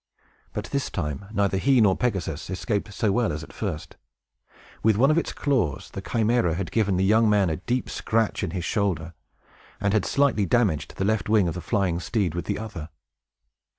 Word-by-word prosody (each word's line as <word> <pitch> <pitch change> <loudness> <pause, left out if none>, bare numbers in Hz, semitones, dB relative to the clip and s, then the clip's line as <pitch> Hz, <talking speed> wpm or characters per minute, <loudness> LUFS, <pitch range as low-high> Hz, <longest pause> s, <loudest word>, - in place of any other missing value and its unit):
But - - -3
this - - -1
time, 75 +5 -4
neither 100 -2 +1
he 135 +3 +4
nor 100 -4 +5
Pegasus 95 -10 -2
escaped 100 +2 -2
so 105 +1 0
well 115 +2 +1
as 75 +1 -4
at - - -12
first. 90 -8 -5 0.8
With 110 -2 +3
one 135 +6 +5
of 155 - +2
its - - -3
claws, 120 - -1
the - - -5
Chimæra 115 -7 +1
had 90 -1 -4
given 100 -5 +1
the 95 - +2
young 110 +2 +4
man 100 -5 +3
a 80 - -2
deep 125 +7 -2
scratch 115 -1 0
in - - -1
his 90 -3 -4
shoulder, 90 -6 -1 0.7
and 100 0 +1
had 110 -3 +3
slightly 135 -8 +2
damaged 100 -9 +1
the 95 - 0
left 105 -2 0
wing 105 -4 +4
of 85 - -1
the 90 - -5
flying 95 -6 0
steed 95 -2 -1
with 85 - -4
the - - -2
other. 105 -7 -7
100 Hz, 195 wpm, -25 LUFS, 90-110 Hz, 0.8 s, nor